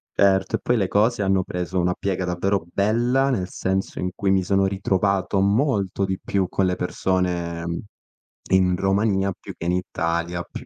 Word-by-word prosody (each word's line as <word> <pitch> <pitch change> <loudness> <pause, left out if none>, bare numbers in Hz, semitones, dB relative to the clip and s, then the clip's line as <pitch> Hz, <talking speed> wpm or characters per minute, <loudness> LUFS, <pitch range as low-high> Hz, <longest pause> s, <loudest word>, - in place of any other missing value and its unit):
Certo, 95 -1 +3
e - - -5
poi 125 - +1
le 95 -4 +1
cose 105 +1 +2
hanno 95 -1 +2
preso 90 +1 -3
una 90 +1 +1
piega 95 -2 -2
davvero 90 0 -1
bella, 120 +7 +2
nel 95 -7 -1
senso 95 +1 -2
in 90 - -1
cui 95 -1 +1
mi 95 -1 +3
sono 95 +1 +2
ritrovato 95 0 0
molto 100 -2 +1
di 95 0 -2
più 95 -2 -1
con 95 0 +1
le 90 - +1
persone 85 -2 -2 0.7
in 90 -1 +3
Romania 95 0 +1
più - - -9
che - - -7
in 90 - +2
Italia, 85 -1 -2
più - - -9
95 Hz, 175 wpm, -23 LUFS, 90-100 Hz, 0.7 s, Certo